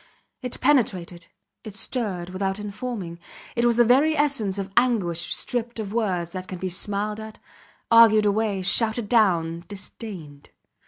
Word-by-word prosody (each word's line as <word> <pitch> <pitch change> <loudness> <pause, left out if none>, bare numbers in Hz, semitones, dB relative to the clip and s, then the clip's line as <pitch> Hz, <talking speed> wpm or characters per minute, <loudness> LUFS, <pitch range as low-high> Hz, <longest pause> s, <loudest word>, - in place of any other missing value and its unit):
It 250 -2 -4
penetrated, 185 -11 +1 0.4
it 215 -3 -9
stirred 200 -7 -3
without 190 +1 -2
informing; 205 -4 -6 0.4
it 235 0 +1
was 235 -1 +3
the 240 - +6
very 285 +7 +4
essence 275 -10 +2
of 195 0 -4
anguish 205 -9 +1
stripped 235 -1 -3
of 210 -2 -5
words 185 -7 -1
that 185 0 -6
can 185 - -6
be 185 +1 -3
smiled 205 +3 -2
at, 220 0 -9 0.5
argued 225 -2 +7
away, 205 -2 0
shouted 220 +3 +2
down, 170 -7 +2
disdained. 185 -7 -9
210 Hz, 145 wpm, -24 LUFS, 185-235 Hz, 0.5 s, argued